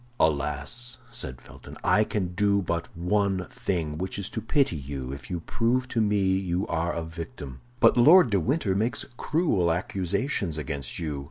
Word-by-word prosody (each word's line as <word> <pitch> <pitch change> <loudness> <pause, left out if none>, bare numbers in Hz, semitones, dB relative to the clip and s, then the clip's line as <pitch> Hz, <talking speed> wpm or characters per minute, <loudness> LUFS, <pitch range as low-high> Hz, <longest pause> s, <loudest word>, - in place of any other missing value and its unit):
"Alas!" 115 - 0
said 65 -1 -3
Felton, - - -13
"I 105 - +4
can 95 -4 -2
do 100 +1 +2
but 85 -1 -2
one 95 +1 +1
thing, 85 -11 -2
which 95 +2 -3
is 100 -2 -4
to 110 - -3
pity 130 - +2
you 70 -2 -5
if 70 -2 -9
you 90 -2 -3
prove 120 +8 0
to 115 - +1
me 105 -2 +2 0.2
you 90 +1 -1
are 85 -1 -1
a 85 - -3
victim! 80 -5 -8 0.2
But - - +5
Lord 155 +2 +7
de 100 - +3
Winter 115 - 0
makes 110 +5 0
cruel 130 - +1
accusations 95 - -1
against 70 -3 -4
you. 75 -4 -3
95 Hz, 170 wpm, -27 LUFS, 80-110 Hz, 0.2 s, Lord